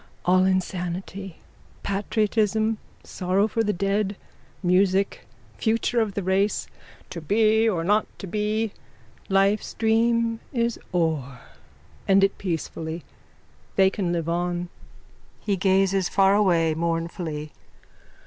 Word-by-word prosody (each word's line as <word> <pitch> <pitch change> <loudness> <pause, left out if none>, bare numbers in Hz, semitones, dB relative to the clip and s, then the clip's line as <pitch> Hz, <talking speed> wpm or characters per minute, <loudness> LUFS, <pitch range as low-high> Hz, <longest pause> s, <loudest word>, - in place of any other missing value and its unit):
_ - - -26 0.2
All 185 +1 +4
insanity. 185 0 -2 0.5
Patriotism, 215 +2 0 0.2
sorrow 190 +3 0
for 225 +1 0
the 210 - +1
dead, 200 +2 0 0.5
music, 190 +2 +2 0.3
future 230 +1 +1
of 210 -3 -2
the 200 - -2
race. 195 +3 +1 0.5
To 170 - -6
be 220 +5 +3
or 170 -6 -1
not 210 +4 +2
to - - -7
be. 210 +3 -1 0.6
Life's 195 +2 +2
dream 230 0 +2
is 235 -2 0
o'er. 150 -8 -1 0.7
End 195 0 +5
it 195 - +1
peacefully. 165 -2 -4 0.7
They 190 -1 +5
can 190 -5 -2
live 165 -2 -2
on. 175 +1 -1 0.8
_(He 200 -3 +1
gazes 190 0 +2
far 195 0 +4
away 175 -6 +3
mournfully.) 165 -2 -3
195 Hz, 115 wpm, -24 LUFS, 175-210 Hz, 0.8 s, End